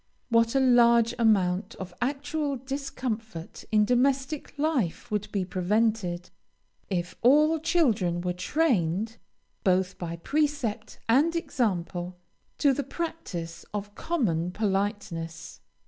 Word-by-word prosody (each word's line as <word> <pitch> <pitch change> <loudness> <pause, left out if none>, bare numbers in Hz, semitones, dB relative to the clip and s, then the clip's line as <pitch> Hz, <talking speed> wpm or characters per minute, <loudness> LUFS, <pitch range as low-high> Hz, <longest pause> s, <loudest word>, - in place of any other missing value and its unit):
What 230 +1 +3
a - - +5
large 235 -2 +5
amount 195 -4 +2
of 185 -1 -8
actual 290 +2 -1
discomfort 240 - -5
in 210 -1 +4
domestic 270 +5 0
life 285 - -1
would 210 -1 -2
be 195 -3 -1
prevented, 185 -1 0 0.6
if 180 -2 -2
all 300 +6 +5
children 240 - +2
were 180 0 -1
trained, 220 - 0 0.5
both 185 -1 +1
by 170 -1 -4
precept 280 - -1
and 290 +9 +4
example, 185 - -2 0.4
to 280 -2 +4
the 285 - -1
practice 205 - -5
of 205 0 -4
common 200 - 0
politeness! 195 -4 -3
225 Hz, 110 wpm, -27 LUFS, 180-275 Hz, 0.6 s, a